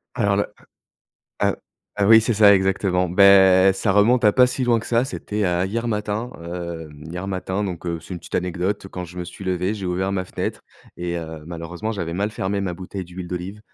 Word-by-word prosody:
Alors 100 -3 +2
là, 100 - 0 1.0
heu - - +2 0.4
heu 100 - +3
heu, - - +3
oui 110 +1 +8
c'est 115 +1 0
ça 100 -1 +7
exactement. 95 -1 +1
Bah, 95 0 +6
ça 95 +2 -1
remonte 110 +5 +4
à 105 - +6
pas 125 +2 +6
si 125 +1 -3
loin 120 -2 +3
que 110 - -7
ça. 120 +1 +2
C'était, 105 -6 -4
heu, 90 0 +1
hier 115 +4 -2
matin, 105 +2 -2
heu, 85 -1 -6 0.2
hier 90 +3 -5
matin 95 +1 -2
donc, 90 -4 -5
heu, 85 -1 -2
c'est 90 - -8
une 85 - -7
petite - - -4
anecdote. 90 +3 -2
Quand 90 -1 -6
je 90 +1 -10
me 90 - -3
suis 95 - -10
levé 95 +2 -1
j'ai 100 -3 -5
ouvert 95 +2 -1
ma 95 -1 -1
fenêtre - - -4 0.4
et 85 0 -3
heu, 80 -2 -7
malheureusement 85 +5 -5
j'avais 85 -6 -3
mal 100 +4 -1
fermé 100 -1 -2
ma 90 -3 -2
bouteille 95 +1 -7
d'huile 90 +1 -8
d'olive. 90 +4 -6
95 Hz, 220 wpm, -22 LUFS, 90-105 Hz, 1.0 s, oui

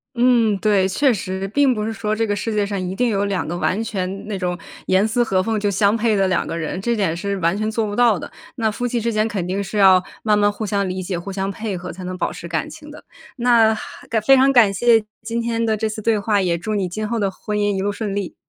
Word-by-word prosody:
嗯， 235 -4 +3
对， 200 -2 +2
确 265 +7 +2
实， 190 -1 -4
并 270 +4 +3
不 215 -1 -3
是 225 - -3
说 210 0 -2
这 225 +1 0
个 205 - 0
世 220 +3 -3
界 210 -1 +1
上 200 -1 -3
一 - - -4
定 245 +6 +1
有 200 -3 0
两 195 -6 -1
个 175 - -3
完 185 +4 0
全 195 -3 -4
那 205 -3 -3
种 180 -1 -2 0.3
严 190 +3 +3
丝 240 +2 +1
合 190 -4 +1
缝 220 +3 -1
就 205 -1 0
相 200 +2 +2
配 225 -2 +1
的 195 -1 +2
两 185 - 0
个 - - -4
人， 165 +3 -4
这 235 +4 0
点 185 -5 0
是 200 +3 -3
完 170 +2 +1
全 215 +1 -1
做 220 0 0
不 205 - -4
到 235 -5 +4
的， - - -7 0.3
那 225 -3 0
夫 245 +3 -4
妻 240 -1 0
之 230 +1 -1
间 215 0 +2
肯 200 -6 -3
定 195 +2 -2
是 200 +2 -5
要 190 -2 +6 0.2
慢 210 -1 +3
慢 205 0 +3
互 215 +1 -5
相 200 -2 0
理 185 +1 -3
解、 180 -1 -3
互 175 +3 -6
相 195 0 -2
配 200 -1 -4
合 180 0 -7
才 185 +2 -9
能 185 0 -5
保 180 - -2
持 - - -9
感 165 -3 -2
情 300 -1 -11
的， 300 - -13 0.3
那 235 -2 +4
还 220 +1 -4
非 270 +6 +5
常 265 +1 +5
感 225 -7 +5
谢 230 +2 +4 0.2
今 230 +1 -3
天 230 0 -1
的 220 -1 +1
这 220 +1 -1
次 215 0 -5
对 220 0 +1
话， 205 0 +1
也 175 -2 0
祝 215 +5 -3
你 190 -3 -1
今 215 +4 -4
后 230 +2 -2
的 200 -3 0
婚 210 +2 -4
姻 205 -1 +1
一 - - -1
路 200 - 0
顺 205 0 -3
利。 200 -2 -4
205 Hz, 300 characters per minute, -20 LUFS, 190-225 Hz, 0.3 s, 要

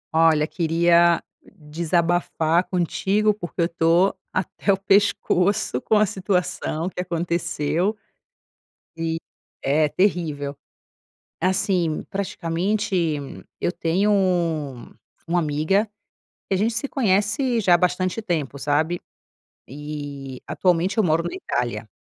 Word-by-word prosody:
Olha, 160 -2 +4
queria 170 +1 +3 0.2
d - - -21 0.2
desabafar 170 +1 +1
contigo, 195 +4 +1
porque 175 -3 -5
eu - - +4
estou 170 +3 +2 0.2
até 185 +2 -1
o 195 - +2
pescoço 195 -6 +2
com 220 - +1
uma 210 0 +5
situação 180 -4 -2
que 180 - -4
aconteceu 170 +2 -1 1.0
e 165 0 -2 0.5
É 150 +3 +3
terrível. 155 -6 0 0.8
Assim, 185 -3 +1
praticamente, 195 +2 -2 0.7
eu 175 - 0
tenho 180 +6 +1 1.2
uma 175 +1 +2
amiga, 155 +7 +1 0.6
que - - +1
a - - +1
gente 220 +4 +1
se 235 +5 -1
conhece 225 +2 +1
já 180 -3 +5
há - - +4
bastante 180 +3 0
tempo, 155 -9 -2
sabe? 155 +5 0 0.7
E, 145 -2 -7
atualmente, 180 +1 +1
eu 220 - +4
moro 165 0 +2
na 175 - -4
Itália. 115 -3 -3
175 Hz, 110 wpm, -23 LUFS, 160-195 Hz, 1.2 s, uma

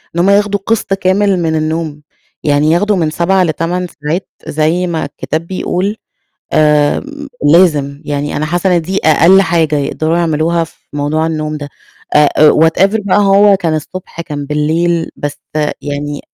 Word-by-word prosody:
إن - - -1
هُم 185 +3 +3
ياخدوا 205 0 +2
قِسْط 225 -3 0
كامل 195 0 +1
من 160 -1 0
النوم، 155 -1 -3 0.4
يعني 150 +1 +2
ياخدوا 205 +4 +2
من 160 -4 0
7 185 +4 +1
ل8 175 +2 -2 0.2
ساعات 165 +6 -2 0.2
زي 160 +4 0
ما 165 -3 -2
الكتاب 155 +3 -5
بيقول، 190 +2 -2 0.6
آمم 155 - +1 0.3
لازم، 150 -5 +3
يعني 145 0 -3
أنا 155 - -1
حاسّة 175 +3 +1
إن 170 - 0
دي 190 +4 -2
أقل 170 +5 +5
حاجة 165 -4 +1
يقدروا 155 +3 -1
يعملوها 165 0 +1
في 160 - -13 0.2
موضوع 150 +2 -1
النوم 155 -1 -3
ده، 145 -1 -7 0.5
آآ 150 -1 +5
آآ 155 0 +7
whatever 190 +7 +3
بقى 195 - +3
هو 200 0 +5
كان 165 -4 -1
الصبح 170 +2 -7
كان 145 -3 -6
بالليل، 160 +3 0
بس 145 0 -5 0.4
يعني 145 0 -4
165 Hz, 160 wpm, -13 LUFS, 150-185 Hz, 0.6 s, آآ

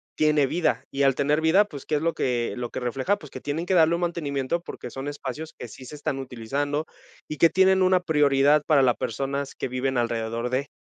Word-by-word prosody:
tiene 150 -2 +3
vida 165 +1 0
y 140 0 -1
al 135 -1 +4
tener 145 +4 +1
vida, 185 +6 +4
pues, 145 -9 -10
¿qué 155 - -5
es 145 - 0
lo 165 0 0
que 120 -2 -1
lo 120 -1 -4
que - - -4
refleja? 130 - -1
Pues, 150 - -12
que - - -8
tienen 155 +4 -3
que 190 - +1
darle 165 -1 +5
un 175 - -4
mantenimiento, 160 -2 -2
porque 125 -7 -8
son 135 +4 -6
espacios 145 +2 -6
que 125 - -7
sí 130 +3 -12
se 135 - -10
están 145 -1 -3
utilizando 140 +5 -3 0.4
y 155 - -6
que 165 - +6
tienen 190 0 +4
una 185 0 +4
prioridad 150 -2 +3
para 145 -3 +4
las 125 -2 +3
personas 140 +4 -3
que - - -3
viven 130 +1 -2
alrededor 115 0 -1
de. 130 +3 -1
145 Hz, 230 wpm, -25 LUFS, 130-160 Hz, 0.4 s, que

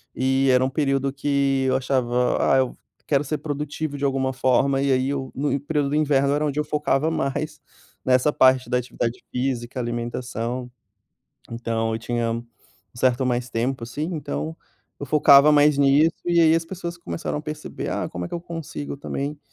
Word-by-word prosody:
e 135 +1 +2
era 125 0 +4
um 130 - +1
período 135 -1 0
que 140 -1 +1
eu 130 - +2
achava: 125 -2 +1 0.2
"Ah, - - +5
eu 130 -2 0 0.3
quero 140 -1 +2
ser 150 +2 -3
produtivo 150 0 -4
de 140 - -2
alguma 135 -1 0
forma" 130 +1 +2
e 140 0 +1
aí 130 +1 +2
eu 135 -2 -3
no 140 +1 0
período 145 0 -1
do 145 - -1
inverno, 140 -2 +2
era 150 +1 +1
onde 145 0 -1
eu - - +1
focava 150 0 0
mais 150 0 -2 0.5
nessa 130 +3 +3
parte 130 -1 +4
da 125 - +2
atividade 120 -1 -4
física, 125 0 -2
alimentação, 120 +1 -4 0.8
então 115 -1 -2
eu 110 - -2
tinha 120 0 -1
um 115 +1 -4 0.5
certo 125 +1 +2
mais 125 0 -1
tempo, 120 +2 -2
assim, 125 +6 -4
então 80 - -4 0.4
eu - - -5
focava 145 -1 +6
mais 150 -1 +5
nisso 145 +4 +4
e 175 -1 +3
aí 160 -1 +6
as 165 0 -1
pessoas 170 -1 -6
começaram 170 -2 -4
a - - -7
perceber" 150 0 -6
Ah, - - -2
como 90 0 -5
é - - -5
que - - -10
eu 170 - -5
consigo 165 -4 -6
também?". 140 +1 -4
135 Hz, 185 wpm, -23 LUFS, 125-150 Hz, 0.8 s, focava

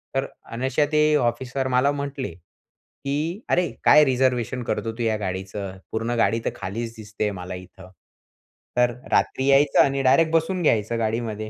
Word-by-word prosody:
तर 135 - +1 0.3
अनायशा 130 +5 0
ते 150 0 +4
ऑफिसर 130 +1 -1
मला 130 +2 +3
म्हटले, 140 - -4
की 145 - -7
"अरे 180 -1 +2
काय 150 +1 +7
रिझर्वेशन 125 -2 0
करतो 115 0 -2
तू 120 - -2
या 110 -1 +1
गाडीचं, 95 0 -5
पूर्ण 115 +2 -2
गाडी 115 +1 +2
तर - - +2
खालीच 115 +5 -5
दिसते 105 -1 -3
मला 90 -1 -6
इथं. 90 0 -12 0.9
तर 125 0 +4 0.2
रात्री 130 - +1
यायचं 140 +1 +4
आणि 135 0 0
डायरेक्ट 155 +5 +4
बसून 175 +3 +1
घ्यायचं 115 -4 +1
गाडीमध्ये, 110 -1 -2
120 Hz, 150 wpm, -23 LUFS, 110-140 Hz, 0.9 s, काय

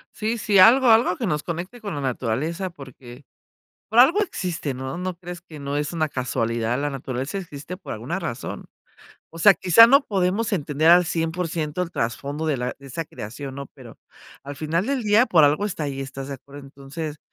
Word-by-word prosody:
Sí, 225 +2 -2
sí, 205 -2 +1
algo 245 +6 +7
algo 225 -4 +5
que 235 - -2
nos 150 -4 -1
conecte 180 +8 -5
con 200 -3 -5
la 145 - -4
naturaleza 135 - -2
porque, 135 -4 -13 0.7
por 225 +3 +3
algo 330 +12 +6
existe, 175 - -3
¿no?, 130 +3 -5
no 180 0 -4
crees 175 0 -9
que 160 -4 -12
no 140 0 -3
es 150 +3 -2
una 155 -2 0
casualidad 115 -2 -1
la 145 +1 -1
naturaleza 135 +4 -4
existe 170 -1 -7
por - - -7
alguna - - -4
razón, - - -6 0.6
o 165 - -12
sea, 195 +5 +7
quizá, 190 +6 +7
no 275 +5 +5
podemos 200 +3 0
entender 155 -2 +1
al 175 +1 +7
100% 165 -1 -2
el 180 - -4
trasfondo 140 +5 -3
de 155 -3 +1
la 125 +1 -3
de 140 - -13
esa 165 +6 -4
creación, 130 +5 -8
¿no?, 140 -1 -7
pero, - - -13 0.5
al 140 0 -7
final 160 +5 -1
del 275 -3 -1
día, 215 +3 +4
por 160 -4 +5
algo 150 +8 +3
está 175 -5 -4
ahí, 140 -2 -4
¿estás 135 0 -7
de 140 - -4
acuerdo? 140 +2 -13
Entonces, 140 +3 -7
160 Hz, 195 wpm, -23 LUFS, 140-185 Hz, 0.7 s, algo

